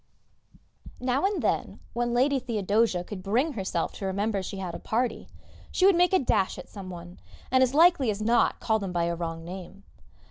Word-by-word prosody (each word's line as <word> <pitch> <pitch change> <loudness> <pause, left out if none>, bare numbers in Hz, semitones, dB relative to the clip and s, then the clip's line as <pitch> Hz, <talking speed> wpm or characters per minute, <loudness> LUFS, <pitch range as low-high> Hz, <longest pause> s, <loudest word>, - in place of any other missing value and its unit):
Now 255 +6 0
and 405 -1 -2
then, - - -1
when 240 0 -1
Lady 265 +3 +2
Theodosia 215 -5 +1
could 190 +1 -7
bring 245 - +1
herself 190 -6 -2
to 195 - -6
remember 200 +1 -1
she 190 +1 -6
had 185 -3 -4
a - - -6
party, 235 +1 -2 0.4
she 370 - +2
would 390 -2 +6
make 355 0 +4
a 380 - +5
dash 205 - +1
at - - -10
some 195 -3 -9
one, 175 0 -10 0.3
and 260 0 +4
as 260 +1 +2
likely 320 -6 +5
as 205 -1 -1
not 230 +3 +2
call 220 -1 +1
them 195 -3 -4
by 175 -1 0
a 170 0 0
wrong 165 -1 -5
name. 190 +2 -9
215 Hz, 200 wpm, -27 LUFS, 185-255 Hz, 0.4 s, would